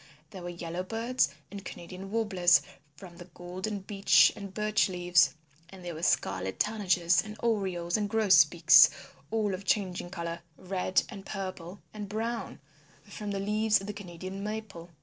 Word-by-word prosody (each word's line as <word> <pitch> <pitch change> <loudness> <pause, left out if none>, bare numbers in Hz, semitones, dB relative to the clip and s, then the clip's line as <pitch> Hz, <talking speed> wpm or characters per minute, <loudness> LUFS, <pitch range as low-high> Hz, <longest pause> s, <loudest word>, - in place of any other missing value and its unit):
There 190 - -9
were 175 - -6
Yellowbirds 185 - -1 0.2
and 200 -1 -8
Canadian 185 +3 -9
Warblers 190 -5 +3 0.3
from 175 -1 -12
the 175 - -10
golden 185 +4 -5
Beech 195 +1 +4
and 200 -2 -8
Birch 215 +1 +1
leaves. 175 -3 +3 0.3
And 185 -1 -12
there 175 - -4
were 160 - -8
Scarlet 95 - 0
Tanagers 180 -5 +2
and 215 0 -9
Orioles 190 -6 0
and 205 -1 -2
Grosbeaks 175 -6 +6 0.4
all 215 -3 0
of 185 +1 -5
changing 185 -3 -1
colours, 170 -2 -5 0.2
red 185 0 0
and 200 -4 -9
purple 185 -2 -6
and 210 -2 -7
brown, 225 +2 -4 0.4
from 210 -2 -7
the 200 -1 -2
leaves 215 +2 +2
of 195 - -8
the 210 - -5
Canadian 185 0 -8
Maple. 210 -5 -6
190 Hz, 150 wpm, -29 LUFS, 175-210 Hz, 0.4 s, Grosbeaks